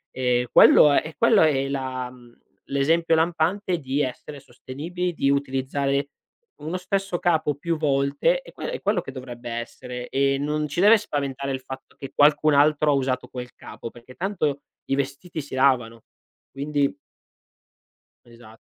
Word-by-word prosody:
Ehm, 125 -1 +1
quello 150 - +7
è - - +4
e 155 0 -8
quello 230 -2 +5
è 135 -4 +2
la 130 -2 -3
uhm, 120 -1 -18 0.3
l'esempio 165 +4 +2
lampante 175 +3 0
di 135 0 -2
essere 140 +2 -5
sostenibili, 160 +8 -5
di 140 -4 0
utilizzare 140 0 -1 0.5
uno 160 +4 -5
stesso 195 0 -2
capo 160 -4 +1
più 165 +3 -2
volte, 145 - +1
è - - -14
que - - -6
è - - -5
quello 205 -2 +1
che - - -8
dovrebbe 120 -2 -8
essere. 125 +1 -6
E 135 0 +1
non 150 +2 -1
ci 150 +4 -2
deve 210 +3 +7
spaventare 140 -8 -3
il 130 - -4
fatto 130 0 -10
che 135 - -8
qualcun 150 +1 +4
altro 150 +1 +4
usato 130 -2 -1
quel 125 -1 -8
capo, - - -9
perché 120 +2 -15
tanto 170 -7 -1 0.3
i 135 - 0
vestiti 140 +5 -4
si 140 - -12
lavano, 125 -4 +2 0.5
quindi 140 0 -1 1.3
Esat 115 -2 -16
140 Hz, 155 wpm, -24 LUFS, 130-160 Hz, 1.3 s, quello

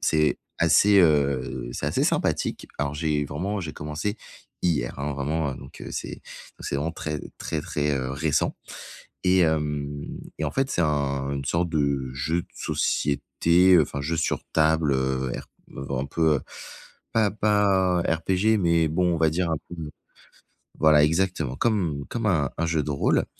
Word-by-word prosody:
C'est 75 -2 +2 0.2
assez, 95 +5 +5
heu, 70 -6 +1
c'est - - -4
assez - - +1
sympathique. - - 0
Alors 70 0 -1
j'ai 75 -1 0
vraiment, 95 +9 -3
j'ai 80 -4 -5
commencé 75 +8 -4 0.5
hier, 70 -10 0
hein, 70 +1 -2
vraiment, 75 +1 -1
heu, - - -8
donc - - -12
c'est - - -6 0.4
c'est - - -2
vraiment 75 +4 -2
très, 75 -3 -4 0.2
très, - - -3
très, 75 0 -1
heu, 65 -1 -3
récent 75 +2 0 0.7
et 90 +1 +4
hem 75 -3 0 0.3
et 80 - -1
en 75 - -2
fait, 135 0 0
c'est 85 - +1
un 70 -3 0
une 70 -1 -4
sorte 85 +4 0
de 70 -4 0
jeu 80 +6 -1
de - - -23
société, 85 +5 +2
enfin 70 -1 -3
jeu 80 +4 -1
sur 80 - 0
table, 80 -2 +3
heu, 65 -1 0
RP - - -7 0.4
un 65 0 -1
peu, 80 +1 +2
heu, - - -6 0.7
pas 110 -3 +3
pas 100 -4 +2
RPG 95 +7 +1
mais 85 -2 +3
bon, 90 +2 +1
on - - -3
va 80 -1 +3
dire, 85 +2 -1
un 80 - +1
peu 85 - -7 1.0
voilà 75 -1 +6
exactement 80 -4 +1
comme 85 - 0
comme 115 -2 -3
un 75 -9 +1
un 85 - 0
jeu 80 -2 0
de 75 - -3
rôle 70 - +2
80 Hz, 165 wpm, -25 LUFS, 70-85 Hz, 1.0 s, voilà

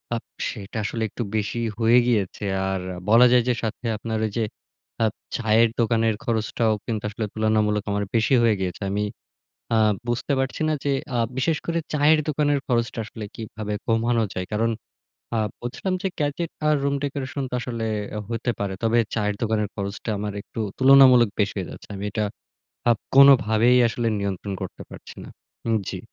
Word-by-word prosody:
Up 115 - -4 0.3
সেটা 105 0 -7
আসলে 110 +2 -2
একটু 120 - -4
বেশিই 115 +2 -1
হয়ে 115 +2 +5
গিয়েছে। 105 -3 0 0.3
আর 95 -1 -2 0.3
বলা 115 +3 +7
যায় 125 -2 +5
যে - - +4
সাথে 110 +2 -4
আপনার 110 +1 -3
ওই 110 - -3
যে 115 - +2 0.6
আপ 110 - 0 0.2
চায়ের 115 0 +4
দোকানের 115 -1 +2
খরচটাও 110 0 0
কিন্তু 110 -3 -3
আসলে 110 +1 -3
তুলনামূলক 110 -1 +1
আমার 100 0 0
বেশি 115 +4 +3
হয়ে 110 -2 +4
গিয়েছে। 95 +1 -3
আমি 105 +1 0 0.7
আ - - +4 0.3
বুঝতে 120 +4 -1
পারছি 135 +3 -2
না - - +2
যে 140 - +1 0.2
আ - - +1 0.2
বিশেষ 150 +3 +1
করে 170 0 0 0.2
চায়ের 150 +1 +5
দোকানের 145 -1 +2
খরচটা 115 -1 0
আসলে 110 0 -8
কিভাবে 110 -1 -5
কমানো 115 0 +2
যায়? 90 0 -3
কারণ 115 +2 +1 0.7
আ - - +1 0.2
বলছিলাম 155 +10 -3
যে 190 - +1
গ্যাজেট 150 +3 -1 0.2
আর 150 - +4
রুম 140 - +1
ডেকোরেশন 140 0 -3
তো - - -4
আসলে 115 -2 -3 0.3
আ - - -2
হইতে 115 +1 -1
পারে। 100 -2 -2
তবে 115 +1 +3 0.2
চায়ের 105 -2 0
দোকানের 105 -2 0
খরচটা 100 +3 -4
আমার 105 0 -3
একটু - - -8 0.2
তুলনামূলক 130 -3 +7
বেশি 100 - +1
হয়ে 95 - -4
যাচ্ছে। - - -11
আমি 100 +1 -4
এটা 110 -2 0 0.7
আপ 115 - +3 0.2
কোনভাবেই 125 -3 +6
আসলে 115 0 -1
নিয়ন্ত্রণ 100 0 -3
করতে 95 - -7
পারছি - - -11
না। - - -10 0.4
উম 115 - +3
জি। - - -4
115 Hz, 175 wpm, -24 LUFS, 105-125 Hz, 0.7 s, বলা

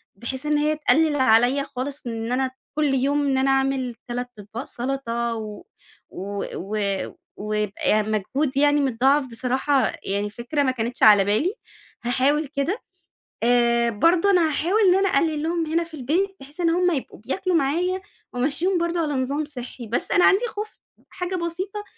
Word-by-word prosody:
بحيث 260 +7 -5
إن 300 0 +2
هي 300 +1 +1
تقلل 310 0 +2
عليّا 260 +1 +4
خالص، 275 +1 -6
إن 225 0 -4
أنا 260 +1 0 0.2
كل 300 -2 +1
يوم 280 +2 +1
إن 270 -1 +1
أنا 270 +1 +2
أعمل 270 -2 0
3 245 0 -4
أطباق 215 +4 -7
سلطة، 235 -3 -3
و 215 -2 -7 0.5
و 200 +1 -5
و 205 +4 -4 0.6
ويبقى 210 -1 -2
يعني 215 0 +2
مجهود 260 +7 -1
يعني 290 +1 +4
متضاعف، 270 +2 +2
بصراحة 260 +3 0
يعني 200 +1 -1
فكرة 240 +7 -2
ما 260 - +2
كانتش 240 0 -3
على 205 -2 +8
بالي 220 - +1 0.5
هاحاول 275 +5 +1
كده 285 - -2 0.6
آآ 235 0 +3
برضه 335 - +3
أنا 350 -4 +4
هاحاول 345 +8 +1
إن 360 - +5
أنا 390 +1 +2
أقلل 305 -1 +1
لهم 335 0 0
هنا 325 +2 0
في 335 -1 -15
البيت، 330 +8 -1
بحيث 285 +5 -14
إن 335 - +3
هُم 355 +2 +2
يبقوا 280 -6 -4
بياكلوا 345 - -2
معايا، 345 +6 +1 0.3
وأمشّيهم 300 +9 0
برضه 340 0 -1
على 300 -2 -1
نظام 275 +3 -1
صحّي، 250 -4 -8
بس 230 - -2
أنا 355 - +5
عندي 390 +5 +4
خوف 430 0 -7 0.3
حاجة 365 0 -4
بسيطة، 370 +4 -4
275 Hz, 165 wpm, -23 LUFS, 240-325 Hz, 0.6 s, على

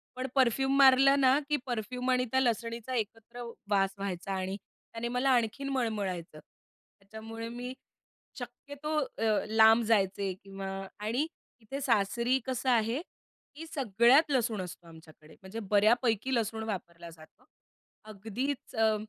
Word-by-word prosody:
पण 255 +1 -3
परफ्यूम 265 +1 +3
मारलं 275 +1 +7
ना, 265 +1 +5
की 295 - +2
परफ्यूम 250 +1 -3
आणि 250 0 +2
त्या 260 - +3
लसणीचा 235 0 -1
एकत्र 225 +2 -5 0.3
वास 195 -1 +2
व्हायचा 195 -1 -4
आणि 190 +1 -2
त्याने 230 +3 -9
मला 250 +3 0
आणखीन 250 +3 +1
मळमळायचं. 200 - -2 0.6
त्याच्यामुळे 225 +3 -8
मी 245 +2 -6 0.7
शक्यतो 300 +2 -5
अ, 225 -6 0
लांब 220 +1 +6
जायचे 195 -3 +1
किंवा 195 0 -7 0.3
आणि 235 +9 -1 0.3
इथे 270 +6 -6
सासरी 235 +2 +2
कसं 260 0 -1
आहे, 235 +3 +2 0.5
की 320 +3 -8
सगळ्यात 260 - +4
लसूण 230 -6 +1
असतो 175 -1 -9
आमच्याकडे. 160 -1 -16
म्हणजे 195 +4 -7
बऱ्यापैकी 225 +3 +3
लसूण 220 -1 -1
वापरला 170 -5 -6
जातो. 155 -1 -17 0.6
अगदीच 220 +8 -5
अ, 220 -1 +3
230 Hz, 130 wpm, -30 LUFS, 200-255 Hz, 0.7 s, मारलं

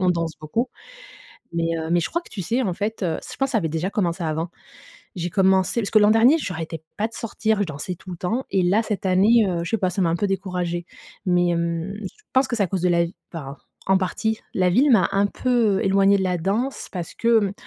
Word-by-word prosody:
On 185 -1 +3
danse 165 -2 -1
beaucoup. 225 +12 -1 0.8
Mais 165 0 0
heu, 160 0 -4
mais 175 0 +3
je - - -3
crois 340 - 0
que - - -16
tu 195 - -5
sais, 235 +7 0
en 185 -6 -1
fait, 215 +1 -3
heu, 165 - 0
ç - - -10
je - - -15
pense 270 -1 +1
ça 225 - +3
avait 165 - -1
déjà 165 +4 -1
commencé 180 -4 -1
avant. 160 +2 -2 0.6
J'ai 175 -1 -3
commencé 190 +4 +3
parce 200 - -3
que 215 - +6
l'an 210 0 +5
dernier, 235 +7 +6
j'arrêtais 165 - -5 0.2
pas 215 - +1
de 230 - -17
sortir, 220 -1 -1
je 200 - +1
dansais 155 +4 -5
tout 185 +2 -12
le 175 - -5
temps. 225 +10 -1
Et 190 - +2
là, 195 +6 +3
cette 210 -3 -3
année, 210 +5 +5
heu, 170 -2 -1
je - - -5
sais 225 - +1
pas, 185 - +1
ça 185 +1 -1
m'a 165 - +2
un 170 - +1
peu 205 - 0
découragé, 180 -3 -2 0.4
mais, 175 -1 +3
hem, 170 +2 -1
je 215 - -9
pense 260 +1 +4
que 235 - -1
c'est 205 - +2
à - - 0
cause 185 0 -3
de 180 - +3
la 170 0 +3
vi 170 +3 -7 0.2
enfin, 140 -4 -7 0.3
en 190 - +4
partie, 220 +4 -1
la 185 -1 +3
ville 270 +10 +4
m'a 220 -7 +5
un 200 +1 +3
peu, 230 -4 +1
éloignée 195 +1 +4
de 190 - 0
la 180 -1 +1
danse 220 +10 -2
parce 175 -3 -5
que, 230 -1 +3
hem, 200 -2 0
190 Hz, 260 wpm, -23 LUFS, 170-220 Hz, 0.8 s, que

